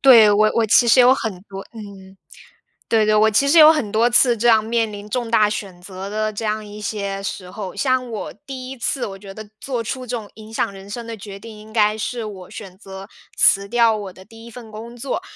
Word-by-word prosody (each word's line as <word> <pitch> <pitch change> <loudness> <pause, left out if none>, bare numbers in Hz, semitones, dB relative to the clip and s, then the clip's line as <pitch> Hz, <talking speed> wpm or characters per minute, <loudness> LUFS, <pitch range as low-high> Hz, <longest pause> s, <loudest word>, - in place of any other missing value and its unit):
对， 230 -6 +8
我 215 +1 +4
我 230 -1 +2
其 225 +3 +5
实 235 +2 +6
有 250 +1 +7
很 200 -8 -5
多 195 0 -7
嗯， 195 -3 -12 0.7
对 220 -2 +2
对， 215 0 +2
我 220 +1 +4
其 275 +7 +2
实 325 +4 +4
有 310 0 +10
很 245 -10 -2
多 230 +3 +3
次 240 -1 +4
这 240 +3 +1
样 220 -2 +5
面 225 0 -1
临 205 0 -9
重 235 0 -3
大 215 -2 +4
选 195 -4 -6
择 190 +1 -8
的 215 +1 -2
这 215 +1 -5
样 215 0 -2
一 205 +1 -10
些 200 -2 -4
时 185 -2 -6
候。 190 -1 -7
像 255 -2 0
我 215 - -6
第 260 -2 -7
1 270 - -8
次， 250 +2 -2
我 195 - -8
觉 195 0 -11
得 215 0 -10
做 245 -4 -3
出 255 +3 -5
这 245 0 -4
种 215 -3 -7
影 220 0 -13
响 225 - -1
人 195 0 -12
生 230 +2 -7
的 230 - -6
决 200 -1 -10
定， 220 0 -11
应 215 +1 -14
该 215 -1 +2
是 235 +2 -4
我 190 -4 -9
选 190 -4 -10
择 195 -1 -10 0.3
辞 200 0 +4
掉 230 0 +3
我 195 -3 -7
的 185 - -15
第 225 +1 -15
1 235 - -12
份 235 -2 -11
工 230 +3 -9
作。 265 +8 -4
215 Hz, 255 characters per minute, -20 LUFS, 200-235 Hz, 0.7 s, 有